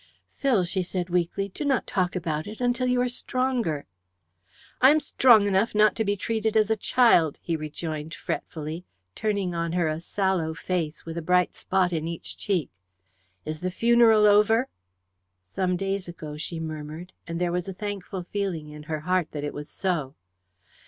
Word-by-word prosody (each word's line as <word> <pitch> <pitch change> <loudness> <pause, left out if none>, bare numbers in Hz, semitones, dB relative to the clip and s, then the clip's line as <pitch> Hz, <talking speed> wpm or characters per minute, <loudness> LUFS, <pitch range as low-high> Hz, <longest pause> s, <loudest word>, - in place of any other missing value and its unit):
"Phil," 250 -9 +1
she 180 +2 -1
said 180 0 -3
weakly, 180 +3 0
"do 200 +10 -6
not 275 -3 +1
talk 185 -2 -1
about 160 -3 -2
it 215 +1 -8
until 250 +1 +1
you 250 0 +2
are 250 - +2
stronger." 245 - -1 1.0
"I 260 - +8
am 305 +2 +5
strong 240 -8 +5
enough 200 +2 +1
not 215 0 +5
to 220 - +1
be 205 -1 0
treated 220 +1 0
as 215 0 +3
a - - +4
child," 205 - +4
he 165 - -2
rejoined 155 0 -5
fretfully, 160 +2 -5 0.3
turning 200 - -1
on 170 0 -2
her 175 -2 +1
a 155 +1 -2
sallow 180 -4 0
face, 165 -3 -3
with 165 0 -4
a - - -5
bright 180 +2 +2
spot 185 -2 0
in 160 -1 -1
each 170 -1 -6
cheek. 185 - -1 0.7
"Is 155 0 -4
the 185 - -2
funeral 230 +1 +5
over?" 210 +5 +4 0.8
"Some 180 - -1
days 195 0 -2
ago," 155 -3 -7
she 160 +2 -5
murmured, 155 +2 -6
and 165 0 -4
there 175 -1 0
was 180 +1 -2
a - - -3
thankful 195 -2 -5
feeling 180 -5 -3
in 150 0 -9
her 155 -1 -2
heart 180 0 +1
that 145 -1 -4
it 145 - -3
was 150 0 -7
so. 155 -8 -2
180 Hz, 180 wpm, -26 LUFS, 160-210 Hz, 1.0 s, I